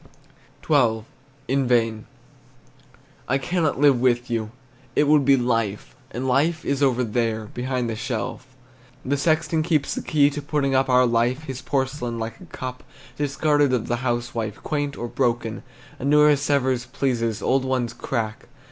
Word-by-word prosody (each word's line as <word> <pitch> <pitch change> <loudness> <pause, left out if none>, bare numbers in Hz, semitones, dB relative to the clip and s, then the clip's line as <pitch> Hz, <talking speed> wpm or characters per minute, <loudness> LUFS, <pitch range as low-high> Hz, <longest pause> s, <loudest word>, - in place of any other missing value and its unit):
XII. 120 -7 +3 0.4
IN 135 0 +1
VAIN. 115 -3 +1 1.2
I 135 - +2
cannot 155 +1 -1
live 140 -4 +4
with 120 -1 +1
you, 110 -2 -1 0.5
It - - +4
would 150 -2 +4
be 140 0 +5
life, 115 -5 -1
And 125 +3 -4
life 155 +5 +1
is 140 0 -1
over 125 -3 +3
there 115 -1 -1
Behind 125 0 -2
the 115 - -3
shelf 120 +2 -4 0.6
The 140 +2 +1
sexton 160 +2 +1
keeps 155 -3 0
the - - -3
key 145 -2 +3
to, 145 +1 -5
Putting 145 -1 0
up 135 0 +2
Our 125 0 +5
life, 120 +4 +1
his 130 -4 -6
porcelain, 130 -3 -2
Like 115 +6 -5
a - - -10
cup 130 -4 -7 0.3
Discarded 145 -1 +2
of 125 - 0
the 120 - 0
housewife, 120 -3 -3
Quaint 145 -2 -2
or 120 - -4
broken; 120 -3 -1 0.4
A - - -4
newer 150 +1 +5
Sevres 130 -3 0
pleases, 115 -5 -1
Old 130 0 +2
ones 130 -3 -1
crack. 110 -4 -4
130 Hz, 155 wpm, -23 LUFS, 120-145 Hz, 1.2 s, be